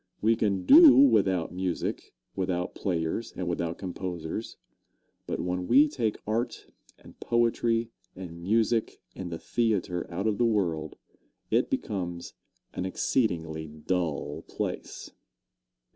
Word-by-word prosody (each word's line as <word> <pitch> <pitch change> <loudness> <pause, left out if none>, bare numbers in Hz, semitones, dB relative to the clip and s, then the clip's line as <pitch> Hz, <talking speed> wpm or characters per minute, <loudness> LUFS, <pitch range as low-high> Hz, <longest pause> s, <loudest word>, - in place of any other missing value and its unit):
We 115 +2 +3
can 100 -4 0
do 315 0 +9
without 95 - +4
music, 90 -1 -3 0.2
without 90 -2 -2
players 90 +5 -2
and 90 - -4
without 85 -1 -2
composers; 90 +1 -5 0.7
but - - -3
when 90 0 -2
we 140 +5 +6
take 120 -7 -2
art 115 +3 -2 0.3
and - - -17
poetry 115 -1 +1 0.2
and 85 -2 -9
music 110 +4 +1 0.2
and 90 -2 -6
the 85 - -3
theatre 100 -6 -1
out 90 +4 -3
of 105 -2 0
the - - +3
world, 85 -8 -1 0.5
it - - +2
becomes 85 -3 -3 0.4
an - - -3
exceedingly 80 -5 -1
dull 80 +1 -3
place. - - -5
95 Hz, 120 wpm, -28 LUFS, 85-115 Hz, 0.7 s, do